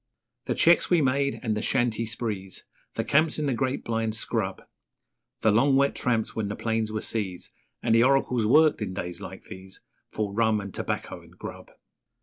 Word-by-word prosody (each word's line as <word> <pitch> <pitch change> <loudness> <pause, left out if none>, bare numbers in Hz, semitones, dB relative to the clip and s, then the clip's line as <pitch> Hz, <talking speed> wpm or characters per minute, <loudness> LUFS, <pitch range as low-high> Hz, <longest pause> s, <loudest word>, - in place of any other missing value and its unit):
The - - -1
cheques 170 +1 +4
we 175 - +4
made 140 0 +1
and 110 -3 0
the 105 - -2
shanty 115 -2 0
sprees, 105 -4 -4 0.3
The - - 0
camps 155 +2 +2
in 155 - -1
the 135 - +1
great 130 +2 -1
blind 115 -1 -1
scrub, 110 -4 -2 0.8
The 110 - +4
long 135 +6 +4
wet 140 +1 +3
tramps 115 -3 -1
when 110 -2 -1
the 105 - -3
plains 110 -1 -1
were 110 0 -2
seas, 95 -5 -3 0.3
And 115 - +2
the 115 - +6
oracles 125 -4 +2
worked 155 +2 +5
in 95 -3 -3
days 90 -2 -5
like - - -8
these 95 0 -11 0.3
For 105 -2 -3
rum 110 0 +2
and 100 -1 -7
tobacco - - -4
and - - -19
grub. - - -8
115 Hz, 185 wpm, -26 LUFS, 105-135 Hz, 0.8 s, the